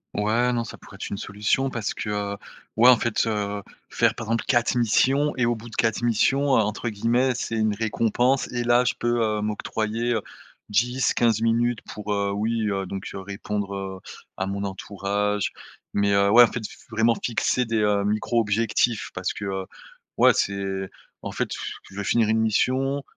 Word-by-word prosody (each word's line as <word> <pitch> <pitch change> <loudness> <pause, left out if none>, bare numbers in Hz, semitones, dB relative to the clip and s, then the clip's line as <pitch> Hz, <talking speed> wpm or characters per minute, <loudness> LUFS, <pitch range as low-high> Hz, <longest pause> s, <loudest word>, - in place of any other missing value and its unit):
Ouais, 115 +4 +2
non, 120 -1 0
ça - - -8
pourrait - - -14
être - - -6
une 100 - -3
solution, 105 +7 0
parce 115 -5 -3
que, 105 - -5
heu, 100 -1 -2 0.4
ouais, 120 +3 +7
en 125 - +7
fait, 115 0 0
heu, 105 -2 -2 0.3
faire, - - +2
par 115 - -6
exemple 115 +1 0
4 120 0 +2
missions 135 +5 +2
et 125 - +2
au 120 0 +1
bout 115 +1 -10
de 110 - -11
4 115 -1 +1
missions, 130 +5 +2
entre 110 0 +1
guillemets 120 +5 +1
«c'est 115 - -3
une 110 -1 +1
récompense» 115 +4 +1
et, 120 -1 -1
là, 120 +1 +4
je - - +1
peux, 120 0 0
heu, 105 -1 0
m'octroyer, 110 +2 -2
heu, 110 - 0 0.5
10-15 120 0 +2
minutes 115 0 +1
pour, 105 0 -5
heu, 100 -1 0
oui, 110 +2 -1
heu, 95 -1 -2
donc 95 +1 -6
répondre, 100 +1 -4
heu, 95 -1 -5 0.4
à 95 - -1
mon 100 +1 -3
entourage 100 +1 -2 0.4
mais 100 0 +2
heu, 100 0 +4
ouais, 120 +3 +9
en 120 - +3
fait, 120 - -4
faut 120 - -14
vraiment 115 +1 +3
fixer 125 +1 +1
des 110 -1 0 0.2
micro 110 +3 +1
objectifs, 115 +1 +1
parce - - -2
que, 105 - -6
heu, 95 -1 -3 0.5
ouais, - - +6
c'est, 95 -1 -2 0.3
en - - -5
fait, - - -2
pff, - - -5
tu - - -16
veux 100 - -3
finir 110 +2 +2
une 110 0 +2
mission 130 +5 +1
110 Hz, 190 wpm, -24 LUFS, 100-120 Hz, 0.5 s, ouais